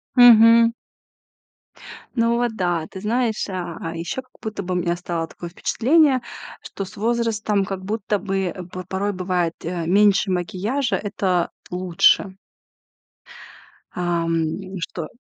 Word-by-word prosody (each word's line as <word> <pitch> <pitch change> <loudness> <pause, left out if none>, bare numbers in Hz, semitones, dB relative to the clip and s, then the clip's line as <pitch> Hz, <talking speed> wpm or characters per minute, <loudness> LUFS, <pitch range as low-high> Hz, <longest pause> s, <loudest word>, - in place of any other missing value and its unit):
Мгм. 230 -1 +8 1.4
Ну 230 -1 +2
вот 240 -2 -1
да, 175 -5 -1
ты 190 - -9
знаешь, 225 +1 0
а, 180 -3 -5
а 165 0 -5
ещё 170 +10 -4
как 255 -1 -32
будто 215 -2 -5
бы 180 0 -3
у - - 0
меня 175 -1 0
стало 170 -2 -3
такое 175 +1 -9
впечатление, 265 - +2 0.4
что 195 - -6
с - - -13
возрастом, 220 -2 0
как 190 -1 -5
будто 210 0 -1
бы, 195 -1 -1
э, 180 +1 -5
п 185 +1 -8
порой 195 +2 -1
бывает, 180 -2 -1
э, 170 0 -3
меньше 200 +2 +4
макияжа- 210 +8 -1
это 185 -4 0 0.2
лучше. 180 +1 +2 1.6
Ам, 170 -2 -1 0.4
что 165 -1 -5
190 Hz, 135 wpm, -22 LUFS, 175-225 Hz, 1.6 s, Мгм